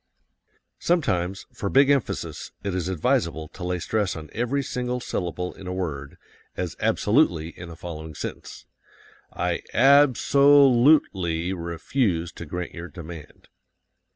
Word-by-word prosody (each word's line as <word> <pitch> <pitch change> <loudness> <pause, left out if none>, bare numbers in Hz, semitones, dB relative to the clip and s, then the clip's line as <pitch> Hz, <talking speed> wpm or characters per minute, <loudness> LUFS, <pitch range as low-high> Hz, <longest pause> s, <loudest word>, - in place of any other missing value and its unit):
Sometimes, 95 - 0
for 100 - -3
big 135 +4 +5
emphasis, 140 -5 -2
it 100 - -2
is 90 -2 -2
advisable 80 -2 0
to 90 - -10
lay 90 0 -1
stress 100 +2 -1
on 80 -1 -9
every 125 +4 -1
single 125 -1 -3
syllable 90 -5 -3
in 95 - -11
a 90 - -3
word, 70 -6 -4 0.4
as - - -3
absolutely 95 - +2
in 85 0 -10
the 85 - -9
following 80 -2 -8
sentence: - - -7 0.7
I - - -2
ab 135 +1 +6
so 140 0 +6
lute 135 +5 +5
ly 85 -2 -2
refuse 85 +1 -1
to 85 - -9
grant 90 +3 -5
your 85 0 -7
demand. 85 -3 -11
90 Hz, 140 wpm, -25 LUFS, 85-125 Hz, 0.7 s, ab